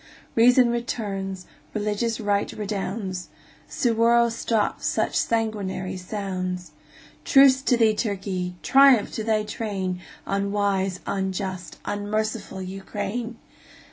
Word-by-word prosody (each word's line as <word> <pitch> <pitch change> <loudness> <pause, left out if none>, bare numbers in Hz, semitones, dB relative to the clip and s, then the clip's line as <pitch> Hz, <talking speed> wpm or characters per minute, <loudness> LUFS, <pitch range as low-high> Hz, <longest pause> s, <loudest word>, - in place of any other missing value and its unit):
Reason 245 +2 +6
returns, 195 -6 -3 0.3
religious 215 +2 -1
right 205 -2 0
redounds, 195 -2 -4 0.4
Suwarrow 235 0 +3
stops 225 -2 -1
such - - 0
sanguinary 210 -5 -1
sounds. 185 -2 -4 0.5
Truce 270 -3 +6
to 255 -3 +2
thee, 225 -2 +4
Turkey! 190 -4 -2
Triumph 270 -5 +6
to 220 - -4
thy 215 -1 +1
train, 195 -4 -3 0.2
Unwise, 200 -1 0
unjust, 190 -3 -3
unmerciful 205 -1 -2
Ukraine! 205 +5 -5
205 Hz, 95 wpm, -24 LUFS, 190-230 Hz, 0.5 s, Reason